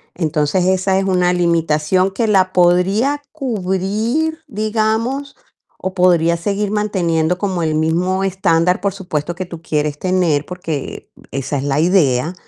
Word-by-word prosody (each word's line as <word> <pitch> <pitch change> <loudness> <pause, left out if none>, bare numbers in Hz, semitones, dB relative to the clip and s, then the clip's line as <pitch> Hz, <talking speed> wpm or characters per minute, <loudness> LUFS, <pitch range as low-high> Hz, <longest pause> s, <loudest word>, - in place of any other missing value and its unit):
Entonces 160 +1 0
esa 190 +1 +2
es 195 - -1
una 180 -2 +2
limitación 170 +1 +1
que 225 +4 -1
la 190 -3 +3
podría 190 +11 +2
cubrir, 225 - -1
digamos, 225 +4 -1 0.4
o 190 - -4
podría 170 -2 +3
seguir 200 +4 -2
manteniendo 180 -5 0
como 185 -3 -2
el 155 -1 0
mismo 175 +5 0
estándar, 180 -2 +1
por 200 0 -1
supuesto, 175 -4 -4
que 185 +1 -4
tú 170 -2 -9
quieres 150 -2 -1
tener, 180 -6 +1
porque, 165 -6 -6
eh, - - -20
esa 135 +1 -3
es 135 - -3
la 140 0 0
idea, 160 -4 +2
180 Hz, 145 wpm, -18 LUFS, 165-200 Hz, 0.4 s, la